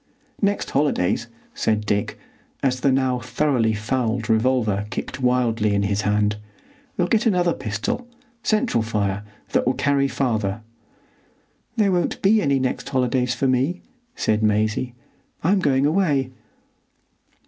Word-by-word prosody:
"Next 200 Hz, 0 st, 0 dB
holidays," 120 Hz, -7 st, +1 dB, 0.3 s
said 110 Hz, -1 st, 0 dB
Dick, 100 Hz, 0 st, -1 dB, 0.5 s
as 130 Hz, -2 st, +1 dB
the 135 Hz, +2 st, +2 dB
now 130 Hz, -1 st, +1 dB
thoroughly 120 Hz, -2 st, +1 dB
fouled 115 Hz, 0 st, -1 dB
revolver 110 Hz, -3 st, +1 dB
kicked 130 Hz, -, -5 dB
wildly 120 Hz, -4 st, +2 dB
in 100 Hz, -, +1 dB
his 100 Hz, +1 st, 0 dB
hand, 105 Hz, 0 st, +1 dB, 0.6 s
"we'll 175 Hz, -, +2 dB
get 225 Hz, +4 st, +2 dB
another 180 Hz, -5 st, +2 dB
pistol,—central 230 Hz, -, -2 dB
fire,—that 105 Hz, -1 st, -2 dB
will 130 Hz, -, +2 dB
carry 140 Hz, -1 st, +2 dB
farther." 110 Hz, -6 st, -1 dB, 1.1 s
"There 210 Hz, -4 st, +3 dB
won't 175 Hz, -2 st, 0 dB
be 210 Hz, +2 st, +5 dB
any 140 Hz, -6 st, +2 dB
next 130 Hz, -1 st, -2 dB
holidays 125 Hz, -1 st, +1 dB
for 135 Hz, +3 st, 0 dB
me," 130 Hz, +8 st, 0 dB, 0.3 s
said 110 Hz, 0 st, 0 dB
Maisie. 110 Hz, +3 st, +1 dB, 0.5 s
"I'm 190 Hz, +5 st, +3 dB
going 140 Hz, -5 st, +2 dB
away." 145 Hz, -6 st, +1 dB
125 Hz, 125 wpm, -22 LUFS, 110-145 Hz, 1.1 s, be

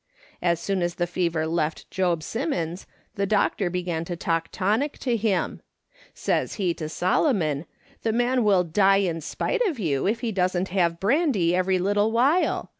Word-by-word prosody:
As 170 Hz, -2 st, +1 dB
soon 190 Hz, +1 st, -1 dB
as 175 Hz, 0 st, -1 dB
the 175 Hz, -, 0 dB
fever 170 Hz, -2 st, -1 dB
left 160 Hz, -1 st, -2 dB
Job 175 Hz, -4 st, 0 dB
Simmons 190 Hz, -, -3 dB, 0.3 s
the 200 Hz, 0 st, -1 dB
doctor 200 Hz, -2 st, +1 dB
began 175 Hz, -2 st, -2 dB
to 175 Hz, -, -4 dB
talk 165 Hz, -2 st, -1 dB
tonic 215 Hz, +10 st, 0 dB
to 245 Hz, -3 st, -1 dB
him; 210 Hz, -4 st, -1 dB, 0.5 s
says -, -, -1 dB
he 185 Hz, -5 st, 0 dB
to 155 Hz, -2 st, -6 dB
Solo 185 Hz, -, +2 dB
mon: 155 Hz, -, -1 dB, 0.2 s
' -, -, -31 dB
The 225 Hz, -, 0 dB
man 245 Hz, +2 st, +1 dB
will 195 Hz, -4 st, +4 dB
die 195 Hz, +4 st, +3 dB
in 170 Hz, -4 st, -1 dB
spite 480 Hz, -, -2 dB
of 325 Hz, -8 st, -2 dB
you, 155 Hz, -, 0 dB
if 225 Hz, +3 st, 0 dB
he 235 Hz, -3 st, -1 dB
doesn't 185 Hz, -1 st, 0 dB
have 170 Hz, -3 st, +1 dB
brand}' 275 Hz, -, +2 dB
every 180 Hz, +2 st, +2 dB
little 205 Hz, +4 st, +1 dB
while. 270 Hz, +10 st, +2 dB
185 Hz, 180 wpm, -25 LUFS, 170-215 Hz, 0.5 s, will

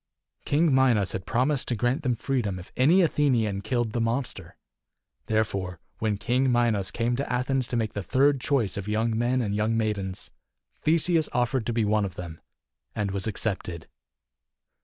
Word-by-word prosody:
King 150 Hz, +1 st, +3 dB
Minos 120 Hz, -8 st, +3 dB
had 95 Hz, -, -5 dB
promised 130 Hz, +3 st, +1 dB
to 120 Hz, -, 0 dB
grant 120 Hz, +5 st, 0 dB
them 125 Hz, -4 st, 0 dB
freedom 115 Hz, -6 st, -1 dB
if 90 Hz, -, -11 dB
any 165 Hz, +9 st, +5 dB
Athenian 120 Hz, -, +1 dB
killed 115 Hz, +1 st, -1 dB
the 115 Hz, -, -1 dB
monster. 120 Hz, +3 st, -3 dB, 0.7 s
Therefore, 100 Hz, -5 st, -1 dB, 0.2 s
when 110 Hz, -2 st, 0 dB
King 125 Hz, +5 st, +1 dB
Minos 115 Hz, -5 st, +2 dB
came 120 Hz, +1 st, -1 dB
to 140 Hz, -, -3 dB
Athens 125 Hz, +1 st, 0 dB
to 120 Hz, -, -2 dB
make 110 Hz, -2 st, -1 dB
the 105 Hz, -, -3 dB
third 135 Hz, +6 st, +2 dB
choice 120 Hz, -11 st, +1 dB
of 100 Hz, 0 st, -5 dB
young 110 Hz, +2 st, 0 dB
men 120 Hz, +3 st, +1 dB
and 100 Hz, -2 st, -2 dB
young 110 Hz, +2 st, +1 dB
maidens, 100 Hz, -4 st, -2 dB, 0.5 s
Theseus 165 Hz, 0 st, +2 dB
offered 125 Hz, -1 st, 0 dB
to 120 Hz, -, 0 dB
be 115 Hz, -2 st, +1 dB
one 105 Hz, 0 st, +2 dB
of 95 Hz, -2 st, -4 dB
them, 85 Hz, -3 st, -8 dB, 0.5 s
and 100 Hz, -2 st, -1 dB
was 100 Hz, +1 st, -2 dB
accepted. 95 Hz, -6 st, -3 dB
115 Hz, 170 wpm, -26 LUFS, 105-130 Hz, 0.7 s, any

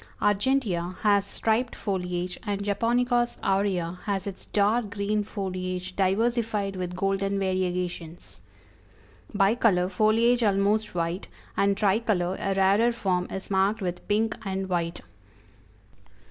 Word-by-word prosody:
Argentea 205 Hz, -5 st, +1 dB
has 200 Hz, -1 st, +3 dB
striped 230 Hz, +4 st, 0 dB
foliage, 180 Hz, -3 st, -3 dB
and 200 Hz, -2 st, -3 dB
Japonicas 240 Hz, +4 st, +1 dB
aurea 190 Hz, -3 st, 0 dB
has 195 Hz, -3 st, -1 dB
its 200 Hz, -2 st, -7 dB
dark 210 Hz, +2 st, +1 dB
green 210 Hz, 0 st, -1 dB
foliage 185 Hz, -2 st, -4 dB
diversified 210 Hz, 0 st, 0 dB
with 180 Hz, -1 st, -4 dB
golden 195 Hz, +1 st, 0 dB
variegations. 180 Hz, -3 st, -3 dB, 0.9 s
Bicolor, 195 Hz, -3 st, +2 dB
foliage 225 Hz, +5 st, +3 dB
almost 205 Hz, 0 st, +1 dB
white, 170 Hz, +2 st, -2 dB, 0.3 s
and 200 Hz, 0 st, +2 dB
Tricolor, 195 Hz, -3 st, +1 dB
a 195 Hz, 0 st, -1 dB
rarer 200 Hz, +5 st, +4 dB
form, 185 Hz, -6 st, -1 dB
is 190 Hz, +1 st, -6 dB
marked 195 Hz, +3 st, +2 dB
with 180 Hz, -3 st, -4 dB
pink 220 Hz, +2 st, +1 dB
and 190 Hz, -1 st, -3 dB
white. 170 Hz, -1 st, -1 dB
195 Hz, 115 wpm, -26 LUFS, 185-215 Hz, 0.9 s, rarer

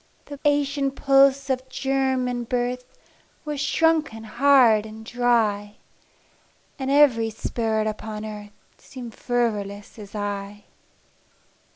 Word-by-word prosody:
The 285 Hz, -1 st, -9 dB
ancient 285 Hz, -1 st, +1 dB
pulse 275 Hz, 0 st, +4 dB
of 260 Hz, 0 st, -3 dB
germ 265 Hz, -1 st, 0 dB
and 245 Hz, -1 st, -4 dB
birth 250 Hz, 0 st, -1 dB, 0.6 s
Was 295 Hz, -2 st, -3 dB
shrunken 305 Hz, -6 st, +1 dB
hard 240 Hz, -1 st, +4 dB
and 220 Hz, 0 st, -10 dB
dry, 220 Hz, -4 st, 0 dB, 1.0 s
And 265 Hz, 0 st, -3 dB
every 270 Hz, -6 st, +4 dB
spirit 220 Hz, 0 st, -2 dB
upon 215 Hz, 0 st, -5 dB
earth 210 Hz, -1 st, -8 dB, 0.3 s
Seemed 245 Hz, -4 st, -10 dB
fervorless 210 Hz, -4 st, -2 dB
as 205 Hz, 0 st, -11 dB
I. 205 Hz, 0 st, -5 dB
245 Hz, 105 wpm, -24 LUFS, 215-270 Hz, 1.0 s, pulse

